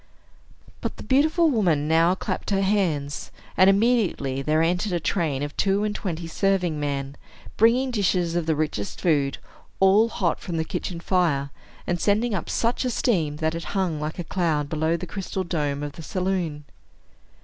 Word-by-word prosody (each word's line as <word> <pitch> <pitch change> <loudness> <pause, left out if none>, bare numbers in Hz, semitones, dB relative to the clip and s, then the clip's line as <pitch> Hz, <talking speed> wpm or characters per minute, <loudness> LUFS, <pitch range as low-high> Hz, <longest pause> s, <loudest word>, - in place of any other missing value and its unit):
But - - -4
the - - -8
beautiful 315 +4 +3
woman 170 - +2
now 165 +3 +4
clapped - - -4
her 195 -1 +1
hands; 165 -8 0 0.3
and 185 +1 +6
immediately 195 - +2
there 155 +3 +2
entered 180 +4 0
a 175 - +1
train 155 -5 -1
of 145 0 -5
two 200 +1 +1
and 210 -1 -1
twenty 175 -5 -4
serving 180 -2 0
men, 140 -1 -3 0.4
bringing 245 +4 +3
dishes 185 -6 +1
of 170 -2 -1
the 160 - +2
richest 150 -10 -3
food, 145 -5 +1 0.4
all 200 +4 +5
hot 180 -6 -1
from 170 -2 -4
the 160 - -1
kitchen 170 +1 -4
fire, 165 -7 +1 0.3
and 175 0 -1
sending 215 +3 +2
up 190 - -3
such 235 +3 0
a 255 - 0
steam 170 - 0
that 160 +1 -1
it 165 0 -4
hung 175 -5 0
like 150 +1 -4
a 175 - -3
cloud 160 -5 -1
below 160 +2 0
the 180 - -6
crystal 190 +1 -4
dome 145 -5 -2
of 145 - -4
the 165 - -10
saloon. 175 -4 -2
175 Hz, 175 wpm, -24 LUFS, 150-195 Hz, 0.4 s, and